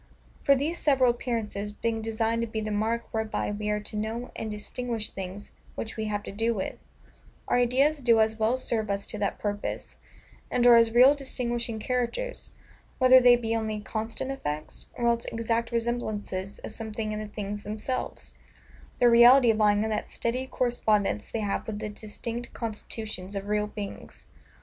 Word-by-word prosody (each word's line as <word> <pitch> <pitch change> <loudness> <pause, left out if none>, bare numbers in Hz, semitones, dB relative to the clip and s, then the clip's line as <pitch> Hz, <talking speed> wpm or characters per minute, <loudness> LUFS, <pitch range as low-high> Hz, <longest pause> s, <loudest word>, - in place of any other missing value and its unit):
For, 280 - +6
these 310 +6 -1
several 265 -4 +4
appearances 225 -4 -3
being 225 +1 -2
designed 225 +1 0
to 230 - -1
be 220 0 -3
the 215 0 -3
mark 220 +3 0
whereby 220 -1 -1
we 210 0 -3
are 210 0 +1
to 210 - -7
know 220 +3 -3
and 220 - -4
distinguish 220 +1 -3
things 195 +2 -7 0.2
which 220 - -5
we 220 - -3
have 205 -1 -2
to - - -6
do 225 +3 0
with, 190 - -2 0.7
our - - +2
ideas 270 +5 +3
do 235 -4 +4
as 220 0 +2
well 225 +4 +2
serve 225 -4 -1
us 200 0 -1
to 215 - -4
that 200 -1 -1
purpose, 205 0 -4 0.5
and 245 -1 +1
are 240 -1 +9
as 230 -1 +6
real 250 +4 +7
distinguishing 240 -4 -3
characters, 250 - -3 0.4
whether 255 0 +8
they 245 -1 +7
be 230 -1 -1
only 220 -1 -2
CONSTANT 225 +5 -3
EFFECTS, 155 - -5
or 240 - -2
else 235 0 +2
EXACT 230 +1 -1
RESEMBLANCES 215 -5 -2
of - - -5
something 220 -1 -4
in 215 - -3
the 215 - -5
things 205 0 -5
themselves: 215 +5 -4 0.6
the 245 - +5
reality 240 +1 +8
lying 210 -1 +3
in 220 - -1
that 210 - -2
steady 250 +3 -2
correspondence 215 - 0
they 225 - -3
have 205 -1 -2
with 215 -2 -3
the 215 0 -4
distinct 225 +3 -6
constitutions 215 -3 -5
of 195 0 -3
real 210 0 +1
beings. 205 -1 -8
225 Hz, 175 wpm, -27 LUFS, 210-240 Hz, 0.7 s, are